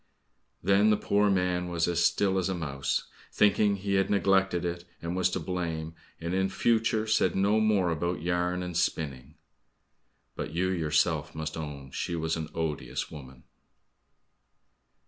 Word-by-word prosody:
Then 100 +3 +4
the 105 - +4
poor 105 0 +2
man 90 -2 +1
was 85 -1 0
as 85 0 +1
still 95 -2 +2
as 95 0 -1
a 95 - -1
mouse, 70 -5 -2 0.3
thinking 105 0 +3
he 100 0 -3
had 95 0 +2
neglected 95 -3 +2
it, 85 0 -3 0.2
and 85 +1 -4
was 95 0 +2
to - - -2
blame, 80 -3 -3 0.3
and 85 +2 -3
in 95 0 +1
future 110 +1 +1
said 110 0 +2
no 100 +3 +3
more 105 -5 +2
about 85 +1 -1
yarn 90 +1 0
and 90 -1 -5
spinning. 75 -4 -2 1.0
But 75 - -5
you 95 +2 +1
yourself 80 -2 +1
must 80 -1 -4
own 70 -4 -7
she 85 - -3
was 80 0 -1
an 80 -1 -4
odious 80 -2 -3
woman! 65 -4 -11
90 Hz, 155 wpm, -28 LUFS, 80-95 Hz, 1.0 s, Then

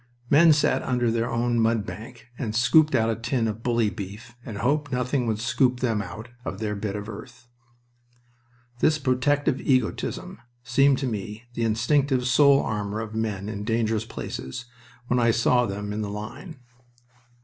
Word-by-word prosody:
Men 160 +3 +7
sat 145 -3 +2
under 120 -2 0
their 115 +1 0
own 120 0 0
mud 115 -2 +2
bank 115 +2 -9
and 110 -4 -4
scooped 150 +7 +4
out 115 0 +2
a - - -1
tin 115 +1 -1
of 110 +1 -4
bully 115 -3 +1
beef 105 +6 -8
and 110 -3 -7
hoped 145 +5 0
nothing 125 0 0
would 110 -2 0
scoop 125 +3 +1
them 115 -4 0
out 105 +4 -8
of 95 - -5
their 105 0 -2
bit 100 0 -3
of 105 0 -5
earth. 115 +2 -10 1.3
This 155 +3 +3
protective 135 0 +1
egotism 130 -4 -1 0.2
seemed 135 +3 +3
to 135 - -2
me 105 -1 -4
the 115 -1 -1
instinctive 125 +4 +1
soul 140 +2 +5
armor 105 -1 -3
of 110 -1 -5
men 105 -3 -2
in 105 -1 -4
dangerous 110 0 0
places 65 - -6 0.4
when 125 0 +1
I 115 -1 +3
saw 120 +2 +3
them 105 +1 -4
in 105 - -3
the 105 - -3
line. 110 - -8
115 Hz, 170 wpm, -25 LUFS, 110-125 Hz, 1.3 s, Men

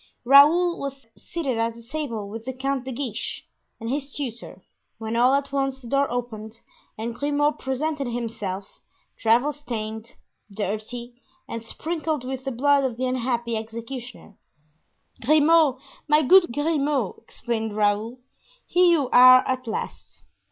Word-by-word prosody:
Raoul 315 +7 +6
was 275 -2 -6
seated 275 -9 -3
at 230 0 0 0.2
table 235 -10 -3
with 220 +2 -8
the 260 - -4
Count 265 0 -2
de 265 - -4
Guiche 245 -3 -4 0.3
and 225 - -6
his 275 +3 -3
tutor, 245 -5 -6 0.3
when 220 0 -4
all 250 +3 +4
at 280 0 -2
once 270 -1 -1
the 245 - -12
door 275 +3 +1
opened 230 -2 -5 0.4
and 230 +2 -4
Grimaud 290 +3 0
presented 275 +1 -2
himself, 225 -5 -5 0.4
travel 235 +6 +3
stained, 225 -5 -6 0.4
dirty, 220 +5 -5 0.3
and 230 -1 -6
sprinkled 315 +3 -3
with 260 +1 -5
the 270 - -2
blood 280 +3 +3
of 250 -3 -2
the 255 - -1
unhappy 240 -2 -1
executioner. 230 0 -8 0.8
"Grimaud, 305 0 +4 0.3
my 300 +1 +4
good 345 +2 +6
Grimaud!" 290 - 0
exclaimed 225 -2 -4
Raoul 210 +3 0 0.5
"here 360 0 +4
you 320 -6 +3
are 255 +1 +8
at 255 -1 -2
last! 220 - -6
255 Hz, 135 wpm, -24 LUFS, 230-285 Hz, 0.8 s, are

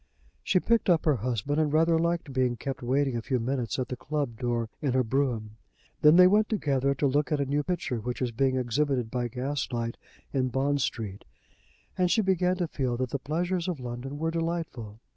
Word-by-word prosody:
She 185 - +2
picked 230 +1 +2
up 170 -3 +3
her 150 -4 +3
husband, 125 +6 -1
and 150 -2 +1
rather 165 +1 +3
liked 170 -3 -1
being 130 -2 +1
kept 135 +2 -5
waiting 135 +1 +1
a 115 - -1
few 125 +2 -1
minutes 120 -2 -2
at 130 -2 -2
the 125 - -3
club 140 -3 -3
door 120 -2 -1
in 140 -4 0
her 130 0 +3
brougham. 115 -4 -1 0.4
Then 150 +2 +7
they 180 +1 +9
went 210 +3 +4
together 140 - +1
to 140 - 0
look 145 +3 +1
at 150 - +1
a 140 - +1
new 145 +2 0
picture, 155 -8 -2
which 125 +3 -4
was 125 -2 -1
being 130 +3 +1
exhibited 125 -1 0
by 125 -1 -1
gas 130 +4 -3
light 115 -1 -3 0.4
in 130 -2 +1
Bond 140 +3 0
Street, 105 -5 -3 0.8
and 180 -1 +3
she 220 +3 +3
began 185 -1 +2
to 175 -2 -1
feel 130 -6 -2
that 130 -1 -2
the 140 - -1
pleasures 175 +5 -1
of 175 -6 -2
London 125 +3 -6
were 160 +2 -1
delightful. 165 -10 -3
135 Hz, 210 wpm, -28 LUFS, 125-160 Hz, 0.8 s, they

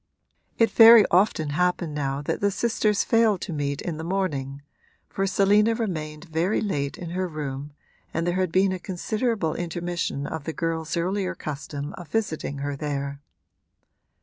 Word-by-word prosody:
It 225 -2 +3
very 225 -1 +9
often 175 -4 +3
happened 180 0 0
now 140 -1 -2
that - - -2
the 200 - +3
sisters 215 0 +1
failed 225 -4 +3
to 180 - -4
meet 140 -2 -2
in 170 -3 -3
the 160 - -5
morning, 145 -7 -2 0.4
for 195 0 -2
Selina 205 +3 +3
remained 155 -9 -4
very 170 +4 0
late 145 -9 -2
in 170 -2 -7
her 185 +1 -1
room 145 -3 -5 0.4
and 165 +1 -1
there 175 +1 0
had 185 -3 0
been 190 +2 +3
a 185 - -3
considerable 205 -1 -1
intermission 175 -4 -3
of 160 -2 -5
the 160 - -3
girl's 165 0 -2
earlier 185 +2 -1
custom 145 -1 -6
of 175 - -9
visiting 160 -10 -2
her 145 0 -2
there. 140 -1 -4
170 Hz, 160 wpm, -25 LUFS, 150-195 Hz, 0.4 s, very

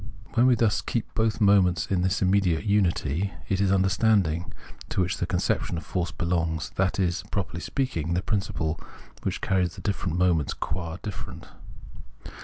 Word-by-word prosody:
" - - -21
When 120 +2 +4
we 125 - +5
thus 110 -2 +2
keep 115 - -3
both 110 -1 +1
moments 100 -4 +4
in 95 -2 0
this 95 +2 +1
immediate 95 -4 +2
unity, 95 -3 +1 0.2
it 95 0 +1
is 100 -1 +3
Understanding, 95 -3 +2 0.4
to - - -2
which 90 0 +1
the - - -2
conception - - 0
of 80 - -6
force 90 -2 -1
belongs, 85 -3 -1
that 95 +1 0
is, 90 -1 +1
properly 90 -4 -3
speaking, 85 - -1
the 90 - 0
principle 85 -7 -1 0.4
which - - -3
carries 90 -2 +1
the - - -9
difierent 95 -5 -1
moments 85 -5 +2
qua 85 +1 -4
different. 105 -3 -7
95 Hz, 165 wpm, -26 LUFS, 85-100 Hz, 0.4 s, we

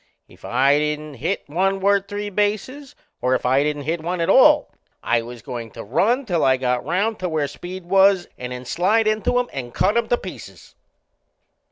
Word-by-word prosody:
If - - -20
I 135 +4 +3
didn't 150 0 -3
hit 160 +10 -3
one 190 +6 0
worth 200 0 +2
three 205 0 -5
bases, 215 +8 -2 0.3
or 130 +1 +2
if 125 - -3
I 130 +2 +3
didn't 145 0 -2
hit 160 +3 -2
one 175 +2 -3
at 170 +3 +2
all, 295 +4 +5 0.3
I 120 0 +1
was 120 -1 -10
goin' 120 -2 -6
to - - -6
run 235 - +1
till 175 -7 0
I 130 -1 +4
got 125 -1 -1
round 195 - -1
to 185 -1 -2
where 155 -3 -1
Speed 180 +4 -9
was, 190 0 +4
and 125 0 -7
then 125 0 -7
slide 200 - +1
into 215 +3 +1
him 245 0 +1
and 125 -3 -6
cut 210 - +2
him 235 -1 +1
to 240 - +2
pieces! - - -11
175 Hz, 200 wpm, -21 LUFS, 135-205 Hz, 0.3 s, all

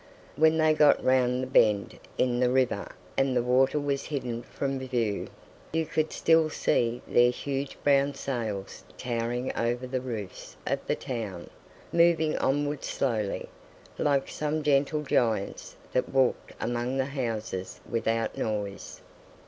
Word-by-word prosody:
When 160 +2 +4
they 155 -1 +4
got 150 -1 +5
round 125 -1 +3
the - - -3
bend 105 -5 +3 0.2
in 120 -1 +1
the 125 -1 +3
river 125 -5 +1 0.2
and 135 -2 +2
the 120 - +2
water 130 +4 +3
was 140 -1 -1
hidden 125 -6 -3
from 135 +1 -3
view, 120 -6 -1 0.5
you 160 0 +1
could 155 0 -1
still 160 -1 +3
see 120 -4 0
their 120 0 +5
huge 135 +2 -3
brown 140 0 +3
sails 110 -8 -4
towering 120 +1 -2
over 120 +2 -1
the 130 0 -2
roofs 110 -7 -7
of - - 0
the - - +1
town, 110 -9 -5 0.4
moving 170 -2 +4
onward 145 +1 0
slowly—like 135 +4 -2
some 155 +1 -2
gentle 145 +1 +2
giants 115 -7 0 0.2
that 125 - 0
walked 130 -2 +1
among 120 +2 -1
the 135 - +1
houses 115 -8 -4
without 115 -1 -1
noise. 105 -2 -4
130 Hz, 135 wpm, -28 LUFS, 115-140 Hz, 0.5 s, got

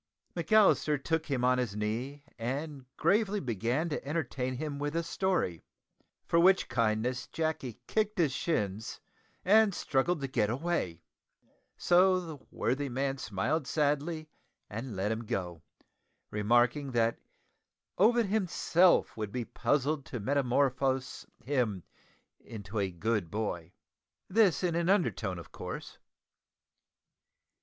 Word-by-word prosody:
McAllister 205 -8 +4
took 160 +1 -1
him 135 -4 -1
on 125 0 +3
his 115 -5 -2
knee 120 +7 -3 0.2
and 135 +3 -4
gravely 210 0 +2
began 120 - -1
to 150 - -3
entertain 135 -4 -2
him 145 +1 -4
with 145 +2 -2
a 170 - +1
story, 170 - -1 0.6
for 170 - +2
which 185 +2 +5
kindness 115 +1 0
Jacky 155 -7 -3
kicked 215 -1 0
his 160 -6 +3
shins 110 - -2 0.5
and 210 0 +5
struggled 155 +5 0
to 135 - -2
get 110 -5 +1
away; 120 - -2 0.7
so 185 +1 +4
the 160 -5 -8
worthy 135 +4 -1
man 135 +2 -2
smiled 125 +7 -1
sadly, 150 +2 0 0.4
and 115 +2 -5
let 95 +3 -1
him 115 +1 -2
go, 90 -6 -4 0.7
remarking 120 +6 +2
that 115 -1 +1 0.8
Ovid 230 +4 +5
himself 185 -3 +3
would 110 -2 -4
be 120 0 -3
puzzled 145 +3 0
to 125 - -5
metamorphose 130 +1 0 0.2
him 120 - -1 0.6
into 105 -1 -6
a 100 -1 0
good 100 0 -1
boy 90 -5 -3 0.6
this 195 -5 +3
in 175 -2 +1
an 170 +1 0
undertone, 115 - +1
of 85 - -10
course. - - -7
135 Hz, 125 wpm, -30 LUFS, 115-165 Hz, 0.8 s, which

